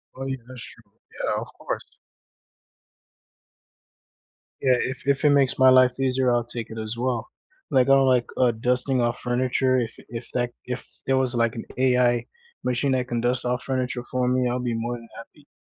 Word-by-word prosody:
Oh, 135 - -6
yeah, 135 0 -2
that's 125 -2 -9
true. - - -15 0.2
Yeah, - - -2
of - - -7
course. - - -4 2.8
Yeah, 130 -2 +4
if 130 +1 -3
if 140 +1 +2
it - - +7
makes 140 -2 +3
my 130 - +7
life 130 0 +5
easier, 130 -1 +2
I'll 120 0 +2
take 120 -1 -6
it 110 - -8
as 110 +1 -4
well. 120 -2 -2 0.4
Like, 130 0 +4
I 135 - +7
don't 135 -1 +4
like, 125 -2 +3
uh, 125 -2 +4
dusting 125 +3 0
off 120 0 0
furniture, 130 +1 +1
if 115 -2 -2 0.2
if 115 0 -7
that 120 -1 0
if 125 - -4 0.2
there 135 0 +3
was, 130 -1 +1
like, 115 -1 +1
an 115 - -6
AI 125 -2 +3 0.4
machine 125 +2 0
that 125 -1 0
can 120 -1 -1
dust 125 +1 0
off 125 0 -1
furniture 125 -2 -2
for 125 -1 +1
me, 125 0 +2
I'd 125 0 -2
be 120 - -1
more 120 +2 -2
than 115 -1 -11
happy. 145 +5 -14
125 Hz, 190 wpm, -24 LUFS, 120-130 Hz, 2.8 s, it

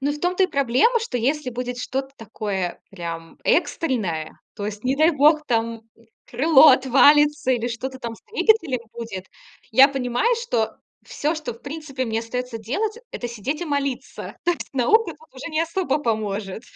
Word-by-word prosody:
Ну, 285 +2 0
в 295 - -6
том-то 360 +2 +2
и - - +2
проблема, 280 - +2
что 430 - -3
если 265 +3 0
будет 245 0 -4
что-то 270 +2 -3
такое 200 -4 -4
прям 165 -3 -7
экстренное, 195 - 0 0.2
то 205 - -4
есть, 210 +2 -6
не 265 +2 +1
дай 315 +3 +5
бог, 300 +1 +4
там 230 -1 -1 0.4
крыло 300 +4 +6
отвалится 285 +2 +5
или 240 -1 -1
что-то 260 +3 -5
там 235 -2 -5
с - - -20
двигателем 345 - +2
будет, 190 -5 -7 0.4
я 270 +2 +7
понимаю, 270 - 0
что 230 - -1 0.3
всё, 305 +3 -2
что 310 -5 -5
в 230 - -17
принципе 285 -3 -5
мне 225 -1 -1
остаётся 250 0 -4
делать- 415 - -2
это 240 - -5
сидеть 240 - -4
и - - -2
молиться. 280 -3 -3
То 350 - +3
есть 335 - -7
наука 335 - +3
тут 305 -2 -22
уже 270 +6 -7
не 310 +1 0
особо 335 0 0
поможет. 215 -4 -2
260 Hz, 170 wpm, -23 LUFS, 230-305 Hz, 0.4 s, я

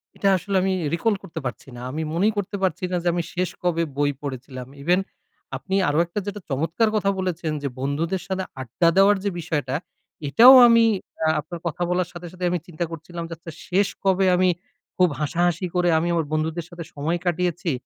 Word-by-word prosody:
এটা 200 - 0
আসলে 195 +3 -4
আমি 190 0 +1 0.2
recall 205 +6 +1
করতে 160 - -6
পারছি 125 - -5
না। 120 - -8
আমি 155 +4 -3
মনেই 200 +6 +2
করতে 205 0 -2
পারছি 185 0 0
না - - 0
যে, - - -1
আমি 175 0 -1
শেষ 180 0 -1
কবে 170 -2 +1
বই 145 0 +2
পড়েছিলাম? 130 -2 -6 0.2
ইভেন 175 +4 +3 0.6
আপনি 190 - -3
আরো 145 - 0
একটা 170 +4 -4
যেটা 205 0 -5
চমৎকার 165 - +1
কথা 200 -2 +2
বলেছেন 175 -4 -2
যে, - - 0
বন্ধুদের 160 +7 -1
সাথে 190 -1 -2 0.2
আড্ডা 150 +8 +2
দেওয়ার 200 +1 +6
যে 205 - +1
বিষয়টা। 150 -6 -2 0.5
এটাও 235 - +9
আমি 230 -1 +6 0.4
আ - - +3
আপনার 160 +3 -7
কথা 170 +1 -5
বলার 180 -1 0
সাথে, 175 0 -8
সাথে 180 0 -4
আমি 180 - 0
চিন্তা 175 0 -3
করছিলাম 170 +1 -7
যে, - - -5
আচ্ছা, 165 +1 -9 0.2
শেষ 195 +2 +2 0.2
কবে 190 0 +3
আমি 185 +1 +3 0.5
খুব 180 -1 +5
হাসাহাসি 170 +3 0
করে 175 -1 +3
আমি 165 +2 0
আমার 165 -2 +1
বন্ধুদের 160 +2 -1
সাথে 175 -1 -8
সময় 155 +4 -1
কাটিয়েছি? 175 -1 0
175 Hz, 195 wpm, -23 LUFS, 155-185 Hz, 0.6 s, এটাও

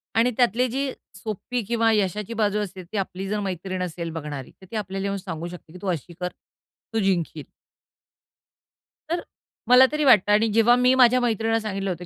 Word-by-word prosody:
आणि 230 +2 +4
त्यातली 245 0 +3
जी 270 +3 -1 0.2
सोप्पी 235 +3 -4
किंवा 230 0 +2
यशाची 210 +1 0
बाजू 210 -2 +1
असेल 190 -3 -5
ती 215 - -3
आपली 195 0 -3
जर 210 +1 -1
मैत्रीण 185 -1 -4
असेल 170 -1 -4
बघणारी 145 -4 -6
तर - - -13
ती - - -6
आपल्याला 195 -2 -3
येऊन 200 0 -1
सांगू 170 -4 -6
शकते, 175 -2 -11
की 180 - -10
"तू 200 - -5
अशी 170 0 -5
कर, 180 - -1 0.7
तू 225 - +1
जिंकशील." 175 -6 0 1.7
तर 340 +1 -1 0.5
मला 250 +1 +8
तरी 300 0 0
वाटतं 210 -6 +6
आणि 215 +2 +4
जेव्हा 230 +2 +5
मी 250 +1 +4
माझ्या 255 -1 +6
मैत्रिणीला 225 -1 +1
सांगितलं 195 -3 -3
होतं, 180 -1 -4
205 Hz, 185 wpm, -24 LUFS, 185-230 Hz, 1.7 s, मला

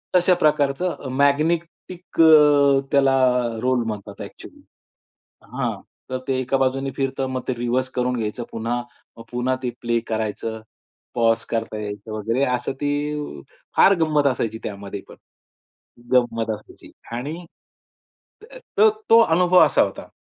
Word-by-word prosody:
तशा 180 +1 +5
प्रकारचं 150 +1 0
मॅग्नेटिक 165 +5 -1
अ, 145 -3 +6
त्याला 135 -1 +4 0.5
रोल 125 -1 +1
म्हणतात 105 -2 -6
ॲक्च्युअली. - - -11 0.8
हां. - - -3 0.3
तर 130 - -2
ते 135 - 0
एका 130 +1 0
बाजूने 135 +1 0
फिरतं. 135 -1 -2
मग 130 -1 -3
ते 130 - 0
रिव्हर्स 120 +2 -1
करून 125 0 0
घ्यायचं 110 +1 -3
पुन्हा. 115 +2 -2 0.4
मग 115 - -10
पुन्हा 125 +1 0
ते 125 - 0
प्ले 120 -1 0
करायचं. 110 0 -3 0.5
पॉज 115 -1 +2
करता 115 -1 -3
यायचं 105 +1 -7
वगैरे. 115 +5 -1
असं 125 +2 -4
ती 145 - -3 0.4
फार 195 - +7
गंमत 150 -2 +2
असायची 115 -4 -1
त्यामध्ये 100 -1 -6
पण. - - -13 1.0
गंमत 115 -2 +1
असायची. - - -16 0.2
आणि, 155 +8 -5 1.0
त - - -11 0.3
तो 435 +1 +7 0.2
तो 230 - +8
अनुभव 180 -1 +4
असा - - +2
होता. - - -6
130 Hz, 135 wpm, -22 LUFS, 115-150 Hz, 1.0 s, तो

